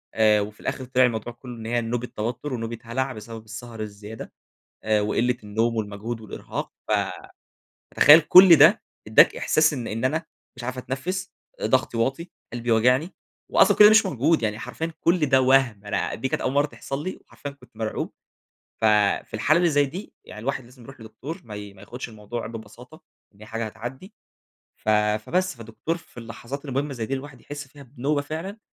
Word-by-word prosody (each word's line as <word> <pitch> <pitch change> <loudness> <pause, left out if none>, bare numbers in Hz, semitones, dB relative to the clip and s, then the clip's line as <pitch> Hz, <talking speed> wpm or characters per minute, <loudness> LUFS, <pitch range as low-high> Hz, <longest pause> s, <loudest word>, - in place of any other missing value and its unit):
آآ 110 -1 +4
وفي 105 +1 -6
الآخر 130 - -4
طلع 130 +1 +4
الموضوع 120 0 -2
كله 120 0 -10
إن 110 - -9
هي 120 +1 0
نوبة 120 +1 -3
توتر، 120 +6 -3
ونوبة 115 -1 -4
هَلَع 130 +3 -2
بسبب 110 0 -9
السهر 115 +1 -9
الزيادة. 105 +1 -8 0.5
آآ 110 -1 +2
وقلة 120 +4 +1
النوم 110 +3 0
والمجهود 110 +2 -4
والإرهاق، 110 - -6
ف - - -3 1.0
فتخيل 150 +3 +8
كل 180 +2 +9
ده 160 +9 +6 0.3
اداك 110 - +6
إحساس 155 0 +3
إن 115 -3 -3
أنا 155 +5 0 0.3
مش 120 - -9
عارف 130 +1 -4
أتنفس، 180 +10 -4 0.3
آآ - - -2
ضغطي 130 -2 +1
واطي، 135 +9 -1 0.2
قلبي 120 0 -2
واجعني، 125 - +3 0.4
وأصلًا 200 +1 +5
كل 210 - +10
ده 210 - +9
مش 220 0 +6
موجود، 145 +4 +1
يعني 105 0 -1
حرفيًا 160 +8 -5
كل 170 -2 +3
ده 130 -2 +4
وَهْم 130 -6 +3
أنا 105 - -2
دي 125 - -2
كانت - - -1
أول 130 - 0
مرّة 145 +1 +3
تحصل 145 -1 -6
لي، 185 - -5
وحرفيًا 145 - -9
كنت 130 -5 -20
مرعوب 110 -1 -3 0.7
ف - - +3 0.4
في - - -29
الحالة 140 +9 +3
اللي 175 -1 +3
زي 145 0 +4
دي 180 +9 -8
يعني 105 - -10
الواحد 135 +2 -2
لازم 125 +1 -17
يروح 135 +1 -13
لدكتور 130 +8 -8
ما 105 -2 -8
ي 105 -1 -8
ما 95 - -16
ياخدش 120 +4 -7
الموضوع 110 +1 -6
ببساطة، 115 +6 -11 0.3
إن - - -24
هي - - -10
حاجة 115 +1 -4
هتعدي 130 - -8 0.7
ف - - -6 0.3
فبس، 180 +8 -1
فالدكتور 115 +8 -4
في 165 -7 -13
اللحظات 115 +5 -8
المهمة 140 +1 -2
زي 115 -4 -4
دي 135 - -2
الواحد 135 -1 -8
يحس 145 +1 -8
فيها 140 +1 -14
بنوبة 140 +3 -2
فعلًا 165 +8 -6
125 Hz, 190 wpm, -24 LUFS, 110-145 Hz, 1.0 s, كل